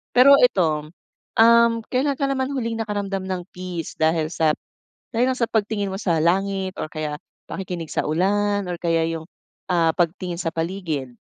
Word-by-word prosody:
Pero 260 Hz, +3 st, +8 dB
ito, 155 Hz, -10 st, +2 dB, 0.5 s
um, 235 Hz, +1 st, +7 dB, 0.2 s
kailan 275 Hz, +2 st, +1 dB
ka 280 Hz, -, 0 dB
naman 270 Hz, -1 st, -1 dB
huling 230 Hz, -3 st, -2 dB
nakaramdam 200 Hz, -2 st, -2 dB
ng 185 Hz, -1 st, -2 dB
peace 180 Hz, -3 st, -5 dB
dahil 160 Hz, 0 st, +2 dB
sa 155 Hz, -2 st, +2 dB, 0.6 s
dahil 235 Hz, +2 st, +2 dB
lang 255 Hz, -, -1 dB
sa 235 Hz, -, +3 dB
pagtingin 205 Hz, -2 st, 0 dB
mo 190 Hz, -, -4 dB
sa 175 Hz, -6 st, +1 dB
langit 190 Hz, +2 st, +1 dB
or -, -, -2 dB
kaya 155 Hz, -1 st, -4 dB, 0.3 s
pakikinig 175 Hz, -4 st, -5 dB
sa -, -, -1 dB
ulan 205 Hz, +5 st, +1 dB
or 175 Hz, -, -5 dB
kaya 165 Hz, -1 st, +1 dB
yung, 160 Hz, -1 st, -5 dB, 0.4 s
ah, 170 Hz, -2 st, +3 dB
pagtingin 175 Hz, +1 st, -1 dB
sa 165 Hz, -, -1 dB
paligid? 165 Hz, -7 st, -3 dB
185 Hz, 165 wpm, -23 LUFS, 165-220 Hz, 0.6 s, Pero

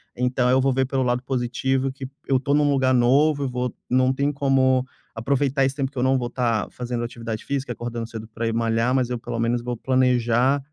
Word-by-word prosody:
então 125 Hz, 0 st, +1 dB
eu 130 Hz, +1 st, +4 dB
vou 135 Hz, 0 st, +2 dB
ver 130 Hz, +1 st, +1 dB
pelo 135 Hz, -1 st, 0 dB
lado 125 Hz, 0 st, 0 dB
positivo 130 Hz, +1 st, -1 dB
que 130 Hz, 0 st, -8 dB, 0.2 s
eu 135 Hz, -, +3 dB
estou 140 Hz, +2 st, 0 dB
num 145 Hz, 0 st, +3 dB
lugar 130 Hz, -2 st, +2 dB
novo, 140 Hz, +4 st, +3 dB
eu 135 Hz, -, -1 dB
vou 125 Hz, 0 st, -3 dB, 0.2 s
Não 130 Hz, +1 st, +3 dB
tenho 140 Hz, +2 st, 0 dB
como 130 Hz, -2 st, +2 dB, 0.3 s
aproveitar 135 Hz, +3 st, +1 dB
esse 135 Hz, 0 st, 0 dB
tempo 135 Hz, -2 st, -2 dB
que 140 Hz, -, -16 dB
eu -, -, +1 dB
não 130 Hz, +1 st, +3 dB
vou 120 Hz, -2 st, -2 dB
estar 120 Hz, -4 st, 0 dB
fazendo 120 Hz, -1 st, -4 dB
atividade 115 Hz, -2 st, -6 dB
física, 135 Hz, -2 st, -3 dB
acordando 120 Hz, -1 st, -5 dB
cedo 110 Hz, -1 st, -8 dB
para 115 Hz, 0 st, -2 dB
ir 115 Hz, -, -1 dB
malhar, 115 Hz, +2 st, +1 dB
mas 125 Hz, -2 st, +1 dB
eu, 120 Hz, -, -2 dB
pelo 115 Hz, -, -5 dB
menos, 115 Hz, +1 st, 0 dB
vou 120 Hz, -1 st, -3 dB
planejar" 125 Hz, +1 st, +2 dB
130 Hz, 225 wpm, -23 LUFS, 120-135 Hz, 0.3 s, eu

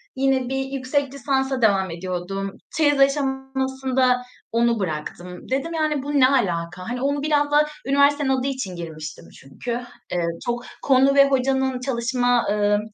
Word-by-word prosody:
yine 265 Hz, -1 st, +1 dB
bir 270 Hz, 0 st, -1 dB
yüksek 270 Hz, +1 st, -2 dB
lisansa 265 Hz, -1 st, -1 dB
devam 195 Hz, -5 st, +3 dB
ediyordum. 185 Hz, +3 st, -4 dB, 0.3 s
Çeyiz 290 Hz, -3 st, +3 dB
aşamasında 265 Hz, -2 st, +1 dB, 0.3 s
onu 235 Hz, 0 st, +2 dB
bıraktım. 180 Hz, +2 st, -5 dB
Dedim: 275 Hz, +5 st, -1 dB
"Yani, 305 Hz, -4 st, 0 dB
bu 290 Hz, +1 st, -4 dB
ne 255 Hz, -, +7 dB
alaka?" 185 Hz, -7 st, -1 dB
Hani, 245 Hz, +1 st, -3 dB
onu 285 Hz, +1 st, 0 dB
biraz 290 Hz, -1 st, +2 dB
da 300 Hz, +1 st, +4 dB, 0.2 s
üniversitenin 280 Hz, +1 st, +3 dB
adı 265 Hz, 0 st, +1 dB
için 255 Hz, -9 st, -3 dB
girmiştim 155 Hz, -3 st, -7 dB
çünkü. 135 Hz, -, -7 dB, 0.4 s
Eee, 175 Hz, -1 st, 0 dB, 0.2 s
çok 240 Hz, 0 st, -2 dB, 0.2 s
konu 270 Hz, 0 st, +4 dB
ve 275 Hz, 0 st, +7 dB
hocanın 265 Hz, -1 st, +1 dB
çalışma, 245 Hz, -1 st, +1 dB
ııı, 205 Hz, 0 st, +2 dB
260 Hz, 145 wpm, -23 LUFS, 205-275 Hz, 0.4 s, ne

